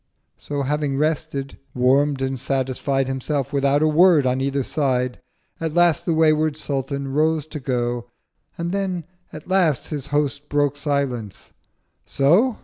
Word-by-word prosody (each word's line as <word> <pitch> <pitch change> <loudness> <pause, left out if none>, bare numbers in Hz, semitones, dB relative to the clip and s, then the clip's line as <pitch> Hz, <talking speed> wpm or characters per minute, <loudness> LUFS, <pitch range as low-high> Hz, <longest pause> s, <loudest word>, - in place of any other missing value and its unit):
So 145 -1 -3
having 145 0 -1
rested, 150 -2 -2 0.2
warm'd 135 +2 +2
and 130 -1 -2
satisfied 135 +1 -1
Himself 135 +2 -2
without 140 +1 +2
a - - +4
Word 160 -2 +5
on 130 +1 +1
either 140 0 0
side, 125 -3 -1 0.4
At 160 -1 -3
last 175 -2 +3
the 170 - +2
wayward 155 -1 +3
Sultan 140 -1 -3
rose 155 +2 +1
to 155 -1 -7
go. 120 -2 -2 0.5
And 170 +1 -3
then 190 -3 -2 0.3
at 155 - -10
last 175 -7 +1
his 145 -3 -4
Host 145 0 -1
broke 145 -1 +1
silence—'So? 140 - -1
145 Hz, 140 wpm, -22 LUFS, 135-155 Hz, 0.5 s, Word